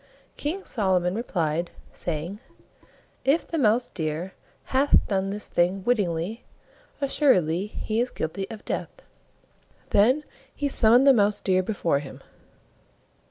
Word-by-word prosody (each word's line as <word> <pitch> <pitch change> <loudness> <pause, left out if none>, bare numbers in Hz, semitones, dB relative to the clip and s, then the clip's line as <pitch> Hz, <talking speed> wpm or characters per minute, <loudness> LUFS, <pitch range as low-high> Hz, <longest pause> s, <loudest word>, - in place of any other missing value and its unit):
King 345 +7 -4
Solomon 185 -5 +1
replied, 170 -7 -1 0.2
saying, 170 +4 -4 0.8
"If 285 +5 +2
the 330 - -3
Mouse 235 0 +3
deer 160 +3 -4 0.4
hath 275 +2 +4
done 195 -1 0
this 205 +1 -5
thing 180 +3 +1
wittingly, 205 -2 -1 0.6
assuredly 200 - +2
he 220 +1 -2
is 250 - -1
guilty 195 +3 -4
of 220 -2 -9
death." - - -5 0.9
Then 250 +9 +4 0.3
he 290 - -1
summoned 240 +1 +5
the 275 - +8
Mouse 205 -3 +2
deer 185 -1 +2
before 180 -7 0
him. 140 -2 -10
205 Hz, 120 wpm, -25 LUFS, 175-245 Hz, 0.9 s, the